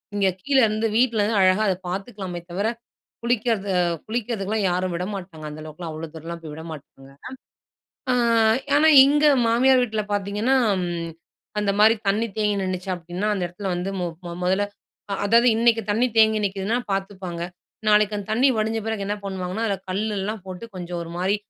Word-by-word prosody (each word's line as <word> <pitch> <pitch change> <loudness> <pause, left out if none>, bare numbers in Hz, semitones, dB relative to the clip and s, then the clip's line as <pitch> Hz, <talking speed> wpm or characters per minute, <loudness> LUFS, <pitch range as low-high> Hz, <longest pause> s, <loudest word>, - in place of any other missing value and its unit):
இங்க 200 -1 +2
கீழருந்து, 225 -3 +2
வீட்லருந்து 225 -3 +2
அழகா 185 +3 +4
அத 190 - +2
பார்த்துக்கலாமே 190 -2 -5
தவிர, 200 +5 -1 0.6
குளிக்கிறது 230 -3 0
அ - - +4 0.3
குளிக்கிறதுக்குலாம் 220 -2 -2
யாரும் 180 0 -1
விட 175 - -2
மாட்டாங்க. 175 -5 -8
அந்த 150 +1 -9
அளவுக்குலாம், 160 +2 -7
அவ்வளோ 160 +1 -6
தூரம்லாம் 165 +1 -7
போய் 155 -2 -8
விட 160 +1 -8
மாட்டாங்க. 135 -2 -12 1.0
ஆ - - +3 0.6
ஆனா, 310 +2 +5 0.2
இங்க 295 +2 +3 0.2
மாமியார் 255 +2 +4
வீட்ல 220 -2 -2
பார்த்தீங்கன்னா, 205 +6 +1 0.2
அம் 185 -2 -1 0.7
அந்தமாரி 210 +2 +4
தண்ணீ 215 +4 +2
தேங்கி 210 -1 +1
நின்னுச்சு. 185 0 -3
அப்பிடின்னா, 175 +4 -4
அந்த 195 - -3
இடத்துல 190 +3 -6
வந்து 180 +2 -3
மொ 175 - -1 0.2
மொ 170 - -5
மொதல்ல, 190 +3 +2 0.5
அ - - -1
அதாவது 235 +4 +5
இன்னக்கி 230 0 +3
தண்ணீ 240 +4 +2
தேங்கி 220 -1 +5
நிக்கிதுன்னா, 200 +4 -1
பார்த்துப்பாங்க. 190 -3 -4 0.5
நாளைக்கு 210 0 +4
அந்த 205 -1 -6
தண்ணீ 250 +5 +4
வடிஞ்ச 220 +1 0
பிறகு 220 -3 -2
என்ன 205 +1 -1
பண்ணுவாங்கன்னா, 190 +2 -3
அதில 200 -3 -1
கல்லெல்லாம் 205 +1 -2
போட்டு, 185 +3 -7
கொஞ்சம் 175 -1 -5
ஒருமாரி, 175 +4 -1
200 Hz, 160 wpm, -23 LUFS, 180-220 Hz, 1.0 s, ஆனா